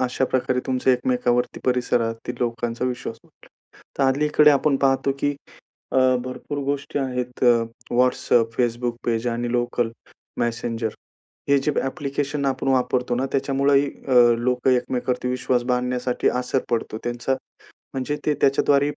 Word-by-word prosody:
अशा 130 +1 0
प्रकारे 130 0 0
तुमचं 130 0 +1
एकमेकावरती 125 -1 +1
परिसरातील 125 -2 0
लोकांचा 120 0 -2
विश्वास 125 -2 -3
वाढला. - - -23 0.5
तर - - +2
अलीकडे 150 +3 +4
आपण 140 0 +3
पाहतो 135 0 +2
की 145 +1 0 0.6
अ, 130 - +3 0.3
भरपूर 130 +3 -5
गोष्टी 140 +1 -2
आहेत 125 -2 -3
अ, 120 -2 +5 0.3
WhatsApp, 120 -2 +3
Facebook. 120 -1 0
पेज 115 0 0
आणि 120 0 -2
लोकल 120 -1 0 0.5
मेसेंजर, 115 -1 -1 0.6
हे 140 - +5
जे 145 +2 0
एप्लिकेशन 140 +1 -3
आपण 135 0 -1
वापरतो 125 -1 +1
ना 130 +2 0
त्याच्यामुळे 140 +1 +2
ही 140 - -1 0.2
अ, 120 -2 +6
लोक 125 +2 0
एकमेकांवरती 125 0 0
विश्वास 125 -1 0
बांधण्यासाठी 125 0 0
असर 125 +1 0
पडतो 115 -2 -1
त्यांचा 120 +2 -1 0.6
म्हणजे 135 +2 -2
ते 150 - +3
त्याच्याद्वारेही 140 +1 +3
125 Hz, 135 wpm, -23 LUFS, 120-135 Hz, 0.6 s, अ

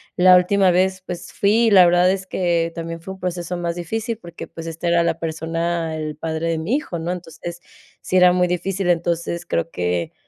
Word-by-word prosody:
la 185 0 +7
última 185 +1 +3
vez, 185 +1 +1
pues 175 -2 -7
fui 220 +4 +3
y - - +3
la 185 -3 +8
verdad 175 +1 +4
es 190 0 -1
que 170 -3 0
también 165 0 -5
fue 190 +3 -8
un 190 - -14
proceso 180 -1 -3
más 170 -1 -2
difícil 220 +6 -3
porque 170 -5 -10
pues 165 - -9
esta 165 +1 -5
era 170 0 +3
la 170 -1 -1
persona, 165 0 -2
el 155 -1 -4
padre 160 +1 -3
de 165 - 0
mi 165 +11 -1
hijo, 240 - -5
¿no? 165 +2 -3
Entonces, 175 -1 -7 0.4
sí 185 - 0
era 180 -1 +7
muy 180 0 +2
difícil, 180 +1 -2
entonces 170 0 -1
creo 85 - -1
que 90 -1 -2
175 Hz, 210 wpm, -21 LUFS, 165-185 Hz, 0.4 s, la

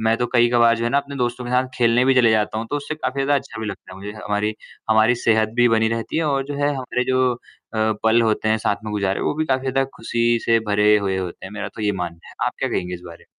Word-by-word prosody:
मैं 110 +1 +2
तो 120 - -1
कई 120 0 +5
कबार 120 -1 +4
जो 115 - -3
है 120 - 0
ना 140 - +3
अपने 140 0 -6
दोस्तों 120 0 -2
के 120 - -5
साथ 125 +1 +2
खेलने 120 +1 +3
भी 135 0 +4
चले 120 -3 +5
जाता 110 0 +1
हूँ 115 - -4
तो 145 - 0
उससे 145 +1 -4
काफ़ी 140 -3 -4
ज़्यादा 145 +1 +2
अच्छा 135 -5 -3
भी 110 - -4
लगता 95 -2 -8
है 95 - -10
मुझे। 100 +1 -7
हमारी 105 0 -2 0.4
हमारी 110 +2 +5
सेहत 110 -2 +2
भी 120 0 +5
बनी 110 -1 +3
रहती 115 +5 -3
है 165 - 0
और 140 -2 0
जो 145 - -5
है 145 - +3
हमारे 125 -1 -2
जो 130 0 +2
अ, - - -14 0.7
पल 115 +1 +4
होते 110 -1 +1
हैं 110 0 +2
साथ 105 -1 0
में 105 - -4
गुजारे 100 -2 -1
वो - - 0
भी 155 - -1
काफ़ी 130 -1 0
ज़्यादा 135 +1 +1
खुशी 120 0 +1
से 115 0 +4
भरे 105 +1 +4
हुए 95 -2 -1
होते 90 0 -6
हैं, 95 - -10
मेरा 105 - -5
तो 110 - -9
ये 105 -1 +1
मानना 85 -3 -6
है। - - -14
आप - - -1
क्या - - -1
कहेंगे 90 0 -2
इस 90 - -8
बारे 85 -1 -11
में? - - -21
115 Hz, 290 wpm, -21 LUFS, 105-130 Hz, 0.7 s, कई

